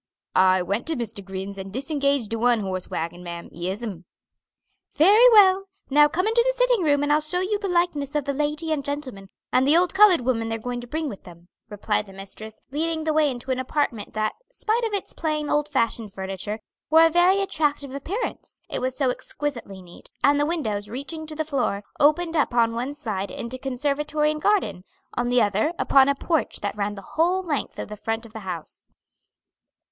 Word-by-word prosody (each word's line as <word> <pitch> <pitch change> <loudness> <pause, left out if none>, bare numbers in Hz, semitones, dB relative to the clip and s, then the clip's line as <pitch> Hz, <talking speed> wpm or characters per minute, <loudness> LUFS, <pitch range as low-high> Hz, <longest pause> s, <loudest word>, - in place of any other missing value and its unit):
"I 185 0 +4
went 200 - -2
to 325 - 0
Mr. 225 -4 -5
Grinn's 195 +1 -6
and 190 0 -7
disengaged 280 -2 -1
de 225 - -2
one 240 -1 +3
horse 185 -2 -4
wagon, 170 +2 -4
ma'am; 170 -1 -7
yes'm." 185 +1 -5 0.9
"Very 420 +10 +7
well. 390 -4 +6 0.3
Now 295 +1 +7
come 350 +6 -1
into 455 +2 +3
the - - 0
sitting - - +3
room 290 -2 +3
and 290 0 +2
I'll 305 - +3
show 310 +4 -1
you 410 +2 0
the 400 - -3
likenesses 345 -6 0
of 295 -2 0
the 280 - -1
lady 300 +3 -1
and 295 -3 0
gentleman, 265 -9 -5 0.2
and 260 +1 +3
the 305 +3 +6
old 355 0 +2
colored 385 -6 +6
woman 230 -2 0
they're 225 - -1
going 245 +2 -4
to 240 - -10
bring 315 +4 -2
with 205 -8 -7
them," 175 -1 -15 0.2
replied 210 0 -1
the 195 - -12
mistress, 200 +3 -8
leading 320 +2 -1
the 310 0 0
way 305 -1 +3
into 255 0 -5
an 255 - 0
apartment 255 -6 -2
that, 215 0 0 0.2
spite 470 -1 -1
of 450 - 0
its 400 - -3
plain, 305 -2 -2
old 295 0 +1
fashioned 230 -6 -1
furniture, 195 +3 -5 0.3
wore 320 +2 +7
a - - +5
very 355 +4 +4
attractive 295 -7 -1
appearance, 365 - -5
it - - -1
was 255 0 -2
so 265 -3 +2
exquisitely 235 -9 -5
neat; 175 -1 -14
and 285 0 +4
the 290 - +2
windows, 215 -12 -2
reaching 300 +6 -6
to 310 - -7
the 315 0 -2
floor, 255 -9 -1 0.2
opened 325 +3 +3
upon 240 -6 +2
one 250 +5 -3
side 210 -9 -3
into 245 +2 -6
conservatory 295 +3 0
and 305 0 -5
garden, 405 - +1 0.3
on 245 0 -1
the 245 -1 +4
other 210 - +1
upon 275 0 +5
a 280 - +2
porch 320 +2 -1
that 205 0 -3
ran 205 0 -2
the 195 - -11
whole 360 +4 +2
length 305 -6 -3
of - - -5
the 210 - -7
front 225 +2 -3
of 225 - -14
the 220 - -6
house. 180 -5 -7
275 Hz, 205 wpm, -24 LUFS, 215-315 Hz, 0.9 s, Very